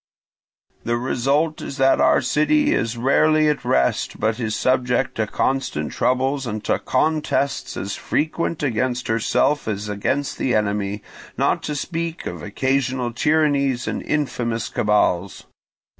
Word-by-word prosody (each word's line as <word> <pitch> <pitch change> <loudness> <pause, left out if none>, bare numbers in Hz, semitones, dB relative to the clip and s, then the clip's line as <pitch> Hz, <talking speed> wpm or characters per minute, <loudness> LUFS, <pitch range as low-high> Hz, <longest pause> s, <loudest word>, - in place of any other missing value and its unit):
The 120 0 0
result 140 +6 0
is 140 - -6
that 135 -1 +4
our - - +4
city 290 - +2
is 115 +1 -1
rarely 155 +5 +3
at 150 - -1
rest, 65 -1 0
but 110 +2 0
is 110 -2 -2
subject 130 0 +1
to 110 -1 0
constant 125 - -1
troubles 130 +1 0
and 110 -1 -4
to - - 0
contests 155 -3 0
as 100 +1 -3
frequent 160 +1 -2
against 125 -1 -1
herself 130 +6 +1
as 105 -1 -3
against 105 +7 -2
the 125 - +1
enemy, 105 -1 -1 0.3
not - - +1
to 150 - -2
speak 165 +2 -4
of - - -5
occasional 130 -2 -1
tyrannies 140 -3 +1
and - - -2
infamous 120 -6 -2
cabals. 100 -3 +1
130 Hz, 135 wpm, -21 LUFS, 110-145 Hz, 0.3 s, that